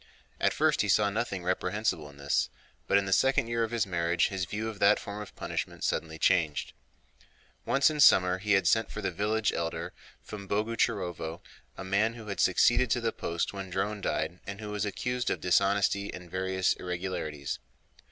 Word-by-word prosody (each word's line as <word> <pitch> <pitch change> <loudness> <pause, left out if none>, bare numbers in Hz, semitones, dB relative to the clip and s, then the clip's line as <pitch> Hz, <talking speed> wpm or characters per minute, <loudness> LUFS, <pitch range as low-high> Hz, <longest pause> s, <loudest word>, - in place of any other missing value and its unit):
At - - +3
first - - +2
he - - -1
saw 105 -1 +4
nothing 100 -4 -2
reprehensible 90 -3 -1
in 70 - -16
this, 70 0 0 0.4
but 100 - +4
in 100 - +1
the 95 - 0
second 135 +1 +3
year 115 0 0
of 115 - -1
his 115 -2 0
marriage 85 -2 +1
his 95 -2 -2
view 105 +5 -4
of 110 -2 -6
that 100 +1 +5
form 105 +1 -6
of 105 - -10
punishment - - -4
suddenly 80 -1 -1
changed. 80 -2 +1 0.9
Once 135 0 +4
in 150 - -4
summer 90 -9 +6
he 105 +1 +1
had 95 - +3
sent 110 0 +3
for - - -6
the 110 - -2
village 105 +4 0
elder 80 -1 -3 0.3
from 100 -2 -9
Boguchárovo, 100 -6 -1 0.4
a - - -6
man 105 +5 +1
who 115 -2 -10
had 100 - -4
succeeded 120 +6 +4
to 120 - +2
the 115 -1 0
post 85 -2 -3
when 95 -2 -6
Dron 100 +3 -2
died 90 -1 -2
and 100 +1 -6
who 105 -1 -6
was 105 0 -1
accused 125 +4 -2
of - - -1
dishonesty 100 +2 +2
and 90 -2 -10
various 95 0 +1
irregularities. 85 -6 -4
100 Hz, 190 wpm, -29 LUFS, 90-110 Hz, 0.9 s, summer